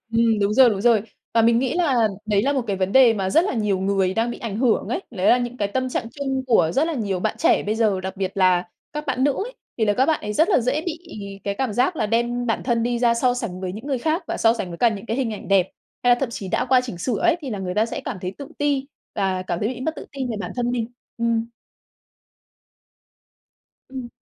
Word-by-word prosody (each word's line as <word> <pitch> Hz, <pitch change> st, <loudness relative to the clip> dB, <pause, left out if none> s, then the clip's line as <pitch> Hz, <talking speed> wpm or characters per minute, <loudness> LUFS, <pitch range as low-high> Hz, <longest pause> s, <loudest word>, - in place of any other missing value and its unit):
Ừm, 230 Hz, -1 st, +3 dB
đúng 200 Hz, +1 st, +2 dB
rồi, 255 Hz, 0 st, +7 dB
đúng 200 Hz, -3 st, -2 dB
rồi. 225 Hz, -1 st, +4 dB, 0.3 s
Và 230 Hz, -, +5 dB
mình 230 Hz, +1 st, +4 dB
nghĩ 255 Hz, 0 st, 0 dB
là 265 Hz, -11 st, +2 dB, 0.2 s
đấy 205 Hz, -2 st, +2 dB
là 280 Hz, +4 st, +2 dB
một 270 Hz, -3 st, 0 dB
cái 200 Hz, -, -1 dB
vấn 190 Hz, +1 st, -1 dB
đề 255 Hz, -4 st, +7 dB
mà 190 Hz, -3 st, -1 dB
rất 325 Hz, -, +4 dB
là 405 Hz, -, -1 dB
nhiều 210 Hz, -4 st, 0 dB
người 190 Hz, -1 st, +1 dB
đang 230 Hz, +2 st, 0 dB
bị -, -, -6 dB
ảnh 210 Hz, -3 st, -4 dB
hưởng 235 Hz, -1 st, +1 dB
ấy, 370 Hz, -, -2 dB
đấy 195 Hz, -5 st, 0 dB
là 245 Hz, -, +5 dB
những 245 Hz, 0 st, -4 dB
cái 205 Hz, -4 st, -1 dB
tâm 260 Hz, +4 st, -1 dB
trạng 250 Hz, -2 st, -2 dB
chung 270 Hz, -2 st, -2 dB
của 225 Hz, -10 st, +4 dB
rất 295 Hz, +4 st, +3 dB
là 330 Hz, -, -2 dB
nhiều 200 Hz, -8 st, -2 dB
bạn -, -, -1 dB
trẻ -, -, +3 dB
bây 210 Hz, -, -1 dB
giờ, 215 Hz, -4 st, +1 dB
đặc 190 Hz, +1 st, -5 dB
biệt 190 Hz, 0 st, -2 dB
là 180 Hz, -2 st, +3 dB, 0.2 s
các 300 Hz, +1 st, -5 dB
bạn 260 Hz, -2 st, 0 dB
nữ 285 Hz, -, +3 dB
ấy, 440 Hz, -, -4 dB, 0.3 s
thì 220 Hz, -, +3 dB
là 205 Hz, -, +3 dB
các 255 Hz, +6 st, +2 dB
bạn 320 Hz, -2 st, +1 dB
ấy 210 Hz, -, -4 dB
rất 320 Hz, -, +3 dB
là 385 Hz, -, +4 dB
dễ 255 Hz, +6 st, 0 dB
bị 335 Hz, -2 st, -3 dB, 0.5 s
cái 200 Hz, -, -1 dB
cảm 255 Hz, +1 st, -2 dB
giác 255 Hz, -, +1 dB
là 215 Hz, -, 0 dB
đem 240 Hz, +2 st, 0 dB
bản 225 Hz, -, 0 dB
thân 235 Hz, -2 st, +1 dB
đi 240 Hz, 0 st, 0 dB
ra 235 Hz, -1 st, +3 dB
so 245 Hz, +1 st, +2 dB
sánh 185 Hz, -7 st, -4 dB
với 185 Hz, -1 st, -3 dB
những 220 Hz, +7 st, -8 dB
người 275 Hz, -3 st, -1 dB
khác 315 Hz, +7 st, 0 dB
và -, -, -2 dB
so 225 Hz, 0 st, +4 dB
sánh 210 Hz, -5 st, -4 dB
với 170 Hz, -1 st, -8 dB
cả 240 Hz, -, +5 dB
những 215 Hz, 0 st, -5 dB
cái 225 Hz, +2 st, -2 dB
hình 250 Hz, -5 st, -1 dB
ảnh 210 Hz, -, -8 dB
đẹp, 195 Hz, -2 st, +4 dB, 0.4 s
hay 245 Hz, -, +4 dB
là 240 Hz, -, -9 dB
thậm 270 Hz, -4 st, -1 dB
chí 195 Hz, -4 st, -5 dB
đã -, -, 0 dB
qua 255 Hz, 0 st, +5 dB
chỉnh 240 Hz, -8 st, -7 dB
sửa 235 Hz, +5 st, -1 dB
ấy 345 Hz, -1 st, +3 dB
thì 280 Hz, -4 st, -6 dB
là 210 Hz, -, -3 dB
người 180 Hz, -1 st, -4 dB
ta 215 Hz, +3 st, +2 dB
sẽ -, -, -5 dB
cảm -, -, -4 dB
thấy 180 Hz, -, -3 dB
tự 280 Hz, -, -7 dB
ti 285 Hz, -2 st, 0 dB, 0.3 s
và 190 Hz, -2 st, 0 dB
cảm 175 Hz, -2 st, -3 dB
thấy 210 Hz, -, 0 dB
bị 250 Hz, 0 st, -5 dB
mất 315 Hz, +5 st, -2 dB
tự -, -, -8 dB
tin 265 Hz, -3 st, -3 dB
về 220 Hz, -, -3 dB
bản -, -, -5 dB
thân 245 Hz, -1 st, 0 dB
mình. 240 Hz, -2 st, -1 dB, 0.3 s
Ừm. 230 Hz, -1 st, +1 dB, 2.4 s
Ừm. 260 Hz, -2 st, -7 dB
235 Hz, 280 wpm, -22 LUFS, 200-260 Hz, 2.4 s, rồi